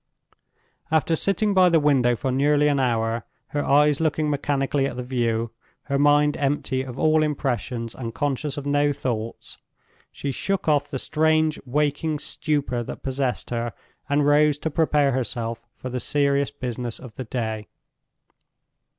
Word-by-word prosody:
After 160 +1 +2
sitting 200 +4 +1
by 185 -2 +6
the 165 -1 +4
window 135 -5 +3
for 130 +2 -2
nearly 145 +3 +3
an 140 -1 +1
hour, 115 -2 0 0.3
her 145 0 -1
eyes 145 +1 +4
looking 155 -1 +1
mechanically 140 -1 0
at 125 - -5
the 125 - -3
view, 115 -2 -1 0.3
her 140 -1 -1
mind 145 0 +4
empty 135 -2 0
of 130 -1 -7
all 155 +1 +3
impressions, 125 -5 -2
and 115 -3 -5
conscious 145 +3 -2
of 145 - -5
no 145 0 +2
thoughts, 115 -5 -4 0.5
she 140 - -4
shook 195 +8 -2
off 145 -2 +3
the 135 - -4
strange 155 +2 +2
waking 150 +3 0
stupor 145 -5 -1
that 120 - -7
possessed 130 -2 -2
her, 120 -1 -2 0.4
and 145 0 +2
rose 145 0 +4
to 160 +2 -3
prepare 150 -2 +2
herself 115 -2 -3
for 130 - -7
the 125 - -2
serious 140 0 +1
business 125 -4 -4
of 125 -4 -11
the 130 - -6
day. 110 -3 -3
140 Hz, 155 wpm, -24 LUFS, 125-150 Hz, 0.5 s, by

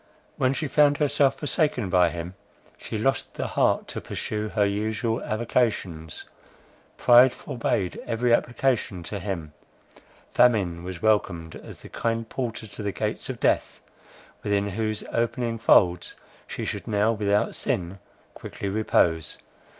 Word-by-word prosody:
When 130 0 +2
she 150 +2 -2
found 145 0 +4
herself 145 -2 +2
forsaken 145 - 0
by 90 -2 +5
him, 85 +2 -6 0.4
she 110 - -6
lost 135 +5 -1
the - - -3
heart - - +1
to - - -5
pursue 105 0 -4
her 105 -2 +2
usual 110 +3 -1
avocations; 105 -8 -1 0.7
pride 125 +1 +7
forbade 115 -8 -2
every 120 +1 +1
application 120 -7 0
to 100 +4 -5
him; 85 -5 -5 0.8
famine 95 -9 +3
was 90 -2 -7
welcomed 85 -7 +1
as - - -11
the - - -11
kind 115 0 -2
porter 120 -2 -4
to 100 0 -7
the 100 -1 -2
gates - - -3
of - - -5
death, - - +1 0.6
within 100 0 0
whose 110 +1 -2
opening 115 0 -1
folds 90 -5 +4 0.3
she - - -5
should - - -4
now, 105 +1 +2
without 105 -2 +1
sin, 90 +2 -3 0.3
quickly 100 - -6
repose. 85 -6 +1
110 Hz, 135 wpm, -25 LUFS, 95-120 Hz, 0.8 s, pride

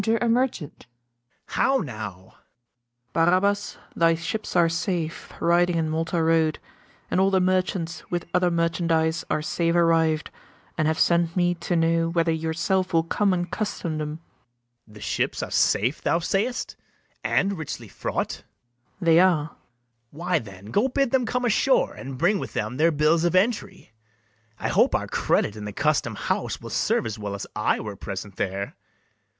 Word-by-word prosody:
Enter 225 0 +2
a 240 - 0
MERCHANT. 230 - -1 0.6
How 270 0 +2
now! 105 - -6
MERCHANT. 120 +3 -30
Barabas, 185 +5 +2 0.2
thy 165 0 +4
ships 185 +7 -4
are 170 -1 +5
safe, 170 -1 -3
Riding 175 +1 +3
in 160 -1 0
Malta 165 +1 0
road; 160 -1 +2 0.5
and - - +2
all 190 +1 +4
the 190 -1 +3
merchants 185 -2 -1
With 175 -1 -2
other 180 0 +3
merchandise 165 -1 +1
are 155 - 0
safe 170 +1 0
arriv'd, 165 -2 +2 0.4
And 155 -2 +1
have 160 0 +1
sent 170 -1 +2
me 175 0 +3
to 175 0 -3
know 165 0 +2
whether 165 -1 +1
yourself 165 +4 -1
Will 165 -1 +4
come 200 +4 +1
and 175 -1 -1
custom 175 -7 -3
them. 150 0 -3 0.7
BARABAS. 105 - -18
The 105 - -12
ships - - -1
are - - -6
safe 125 +8 +2
thou - - +2
say'st, 200 +8 -1 0.5
and 200 0 +1
richly 160 -5 -6
fraught? - - -3
MERCHANT. 120 +8 -16
They 165 0 +6
are. 175 -5 +4
BARABAS. - - -27 0.5
Why, 170 +4 -1
then, 100 -3 -12
go 215 +6 +3
bid 270 -1 0
them 255 -3 +2
come 250 +2 -1
ashore, 250 +3 +2
And 130 0 -8
bring 185 +8 +2
with - - -6
them 125 - -3
their 160 +3 +4
bills 155 +2 +2
of 175 +1 +1
entry: 195 - 0 0.7
I - - -2
hope - - +3
our - - 0
credit 105 - 0
in 105 -1 -7
the 105 - -4
custom 145 -2 0
house - - -2
Will - - -9
serve - - +1
as 110 -1 -4
well 100 -1 -4
as 100 - -5
I 105 - +1
were 105 -2 -6
present 100 0 -7
there. 100 +1 -3
165 Hz, 170 wpm, -25 LUFS, 150-185 Hz, 0.7 s, They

